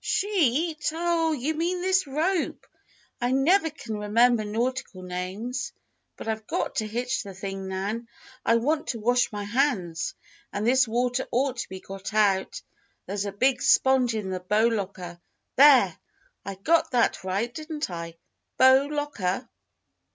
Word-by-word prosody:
"'Sheet'? 325 - +1
Oh! 335 -1 +1
you 300 +1 -1
mean 345 +3 -1
this 375 -3 +2
rope. 320 +6 -1 0.6
I 245 - +1
never 320 +7 +3
can 235 -7 -7
remember 225 +2 +3
nautical 230 -2 -3
names. 185 +8 -4 0.4
But - - -8
I've 220 -1 -3
got - - -2
to 215 - 0
hitch 245 +4 -2
the 195 -4 -9
thing, 195 0 -5
Nan. 200 +5 -3 0.4
I 230 - +3
want 295 +7 0
to 235 - -3
wash 245 +3 +2
my 205 -1 -4
hands. 205 - -1 0.4
And 205 +1 -3
this 255 +1 +4
water 245 +3 0
ought 260 +1 0
to - - -4
be 190 - -7
got 195 +2 -8
out. 200 -3 +1 0.4
There's 200 0 -3
a 200 - -3
big 250 +6 +1
sponge 260 -3 +4
in 200 -3 -3
the 185 - -2
bow 210 +5 +2
locker. 185 -5 -5 0.3
There! 260 - +7 0.5
I 195 0 -6
got 320 - +2
that 240 -6 +1
right, 200 +6 -2
didn't 310 - -5
I? 170 -1 -6 0.4
'Bow 260 +2 +6
locker.'" 285 -9 -2
240 Hz, 150 wpm, -26 LUFS, 200-280 Hz, 0.6 s, There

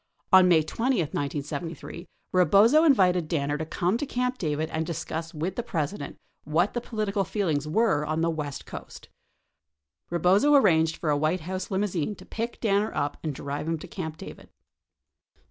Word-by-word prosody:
On 185 -1 +8
May 165 -3 +5
20, 240 +12 0
1973, 150 +2 -4 0.3
Eebozo 200 - +5
invited 180 - +4
Danner 145 -2 -1
to 160 - -4
come 180 +7 0
to 290 - -1
Camp 250 0 -2
David 155 -1 -2
and 160 0 -1
discuss 165 0 -4
with 170 +4 -3
the - - -1
President 160 -5 -4 0.3
what 165 +6 +1
the 240 - -2
political 215 -4 -1
feelings 165 -7 -1
were 170 -2 +2
on 155 +2 -1
the 165 0 +2
west 150 -3 -5
coast. - - -10 1.0
Eebozo 195 - +4
arranged 160 -7 +3
for 155 - -1
a - - +3
White 155 +4 0
House 185 +3 -5
limousine 195 -2 -1
to - - -14
pick 230 +1 -5
Danner 210 -1 +1
up 145 -1 -1
and 155 -3 -3
drive 140 +3 -5
him 165 0 0
to - - -10
Camp 160 -5 -6
David. - - -11
170 Hz, 165 wpm, -26 LUFS, 155-200 Hz, 1.0 s, On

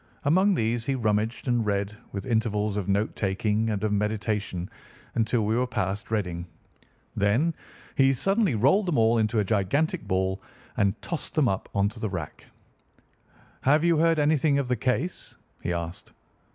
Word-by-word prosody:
Among 185 +7 +4
these 115 -3 0
he 135 - +1
rummaged 110 +1 -1
and 120 -2 +2
read, 100 0 -1 0.2
with 100 - -5
intervals 110 -3 0
of 100 -1 -2
note 100 +3 +1
taking 105 +3 0
and 105 -2 -2
of 105 -1 +1
meditation, 105 -3 -1 0.5
until 115 -1 +1
we 110 +2 +1
were 125 +1 +1
past 105 -3 -3
Reading. 90 -6 -2 0.7
Then 115 +12 +2 0.4
he 135 0 +4
suddenly 195 - +2
rolled 145 - +3
them 170 - +1
all 115 0 +4
into 110 +1 +1
a 105 - +3
gigantic 115 - 0
ball 95 +1 0 0.3
and 100 +1 +1
tossed 170 - -4
them 150 -5 +3
up 95 -4 -2
onto 100 +3 0
the 110 - -2
rack. 85 -5 -6 1.1
"Have 150 +4 +3
you 170 -1 +4
heard 165 +1 +3
anything 150 -1 +3
of 140 -2 0
the 125 - +2
case?" 130 +9 -2 0.3
he - - -2
asked. 85 0 -5
110 Hz, 165 wpm, -26 LUFS, 100-135 Hz, 1.1 s, Among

